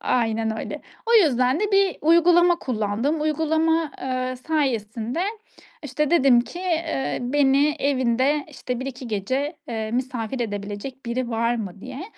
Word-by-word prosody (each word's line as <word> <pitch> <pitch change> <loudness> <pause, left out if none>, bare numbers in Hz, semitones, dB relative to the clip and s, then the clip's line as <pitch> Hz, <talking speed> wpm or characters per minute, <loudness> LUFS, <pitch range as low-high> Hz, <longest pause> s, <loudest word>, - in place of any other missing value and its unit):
Aynen 225 -2 0
öyle. - - -6 0.2
O 470 - +3
yüzden 270 - +4
de 420 -1 -1
bir 390 -2 +3
uygulama 345 +2 +5
kullandım. 235 +5 -1
Uygulama, 320 +1 +1
eee, 255 0 -2
sayesinde, 250 -2 -2 0.6
işte, 290 +1 -1
dedim 270 -7 +5
ki: 295 +8 -7
"Eee, 330 -6 -1
beni 280 +3 +3
evinde, 270 +1 +1
işte, 250 -4 -5
1-2 260 -1 -6
gece, 260 - -2
eee, 220 -2 -3
misafir 245 -1 -3
edebilecek 210 +4 -5
biri 240 +1 -2
var 230 +1 +1
mı?" 200 -4 -6
diye. 265 - -7
260 Hz, 135 wpm, -23 LUFS, 235-310 Hz, 0.6 s, uygulama